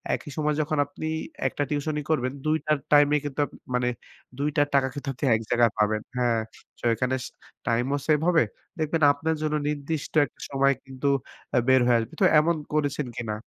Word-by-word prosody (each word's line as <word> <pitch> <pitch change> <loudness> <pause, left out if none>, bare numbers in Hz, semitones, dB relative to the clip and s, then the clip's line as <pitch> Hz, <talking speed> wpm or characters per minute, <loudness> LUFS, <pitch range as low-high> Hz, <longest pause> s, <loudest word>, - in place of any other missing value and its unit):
একই 150 - -9
সময় 150 -1 +1
যখন 155 0 -1
আপনি 155 +2 -6 0.4
একটা 145 - -2
টিউশনি 150 +1 -1
করবেন, 130 -5 +1
২ 155 +1 +3
টার 155 -1 +2
টাইম 145 -1 +7
এ - - +5
কিন্তু 145 0 -5
আপনি - - -14 0.2
মানে 125 0 +1 0.5
২ 145 +1 +1
টার 145 0 +4
টাকা 135 -1 +4
কিন্তু 145 -1 -7
আপনি 130 - -3
এক 110 - -2
জায়গায় 120 -2 +4
পাবেন। 105 0 +2 0.2
হ্যাঁ, 120 -2 +2 0.4
সো - - -7
এখানে 125 +2 0 0.5
টাইম 120 +1 +2
ও - - 0
সেভ 150 -1 +4
হবে। 170 -2 +5 0.4
দেখবেন 155 +1 0
আপনার 160 +3 -1
জন্য 155 0 0
নির্দিষ্ট 150 +1 -3
একটা 125 - -17
সময় 140 0 +3
কিন্তু 130 +1 -4 0.6
বের 130 -1 +6
হয়ে 120 -1 +5
আসবে। 115 +8 -5
তো - - +6
এমন 170 +2 +2 0.2
করেছেন 145 -2 0
কিনা? 110 -3 -3
145 Hz, 190 wpm, -26 LUFS, 125-150 Hz, 0.6 s, টাইম